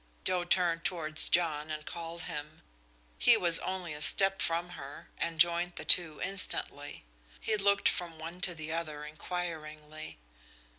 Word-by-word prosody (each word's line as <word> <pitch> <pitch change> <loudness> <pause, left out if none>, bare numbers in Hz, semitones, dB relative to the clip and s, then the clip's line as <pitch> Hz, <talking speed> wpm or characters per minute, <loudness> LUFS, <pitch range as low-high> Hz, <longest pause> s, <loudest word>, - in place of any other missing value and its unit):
Joe 180 -1 +1
turned 175 -2 +2
towards 160 -4 0
John 155 -3 +1
and 155 -1 -5
called 170 0 -6
him. 150 -2 -7 0.6
He - - +6
was 170 -2 +6
only 185 -4 -4
a 150 - -8
step 195 +4 +3
from 170 +1 +1
her, 140 -4 -10
and 165 -1 -3
joined 175 +1 +3
the - - -7
two 165 -4 +5
instantly. 190 - -2 0.3
He 220 - 0
looked 200 -1 +3
from 170 -2 -1
one 165 +3 -8
to 180 -1 0
the 160 0 -6
other 155 -3 -4
inquiringly. 155 - -6
170 Hz, 150 wpm, -31 LUFS, 155-180 Hz, 0.6 s, He